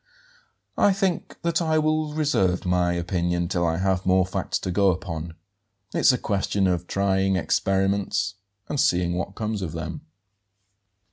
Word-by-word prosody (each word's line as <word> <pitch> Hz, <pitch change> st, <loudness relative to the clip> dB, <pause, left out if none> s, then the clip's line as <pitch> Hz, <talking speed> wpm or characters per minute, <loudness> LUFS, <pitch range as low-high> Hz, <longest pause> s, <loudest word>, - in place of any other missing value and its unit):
"I 200 Hz, -, +5 dB
think 190 Hz, -3 st, -2 dB
that 170 Hz, +1 st, +1 dB
I 160 Hz, -1 st, +1 dB
will 155 Hz, -1 st, 0 dB
reserve 95 Hz, -14 st, +1 dB
my 90 Hz, -1 st, +2 dB
opinion 85 Hz, 0 st, -1 dB
till 90 Hz, -1 st, -1 dB
I 80 Hz, 0 st, 0 dB
have 95 Hz, 0 st, 0 dB
more 95 Hz, 0 st, +3 dB
facts 95 Hz, -, -2 dB
to 95 Hz, -, -4 dB
go 100 Hz, +1 st, +3 dB
upon. 85 Hz, -3 st, -4 dB, 0.6 s
It's -, -, +5 dB
a 125 Hz, -, 0 dB
question 100 Hz, -2 st, 0 dB
of 90 Hz, -1 st, 0 dB
trying 95 Hz, -1 st, +1 dB
experiments 95 Hz, +3 st, 0 dB, 0.3 s
and 145 Hz, -, -2 dB
seeing 90 Hz, -4 st, +2 dB
what 90 Hz, +2 st, -4 dB
comes 110 Hz, -2 st, -3 dB
of 85 Hz, -4 st, -4 dB
them." 80 Hz, -, -5 dB
95 Hz, 150 wpm, -24 LUFS, 90-110 Hz, 0.6 s, I